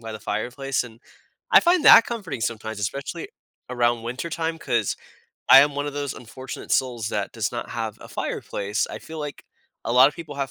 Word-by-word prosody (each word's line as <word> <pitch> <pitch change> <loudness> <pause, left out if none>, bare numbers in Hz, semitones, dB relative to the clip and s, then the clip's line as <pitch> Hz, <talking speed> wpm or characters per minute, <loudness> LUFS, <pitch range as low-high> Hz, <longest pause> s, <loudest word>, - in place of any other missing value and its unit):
by 115 -1 -7
the 110 - -8
fireplace, 125 +5 -2
and 115 -1 -13 0.5
I - - +9
find 345 -1 +3
that - - +9
comforting 195 - -5
sometimes, 110 -1 -3
especially 140 - -4 0.4
around 120 -2 +1
wintertime, 160 +6 -3
'cause 115 - 0 0.5
I 135 - +11
am 145 0 +2
one 145 0 -2
of 145 - -4
those 145 -2 -3
unfortunate 130 +3 -8
souls 120 -4 0
that 100 -1 -2
does 110 -3 -2
not 120 - -5
have 110 -2 -4
a - - -11
fireplace. 100 +1 -3
I - - -6
feel 160 0 -9
like 150 -1 -7 0.4
a - - -1
lot 130 +2 +7
of 150 - -9
people 160 -4 -8
have 140 -1 -2
125 Hz, 195 wpm, -24 LUFS, 115-145 Hz, 0.5 s, I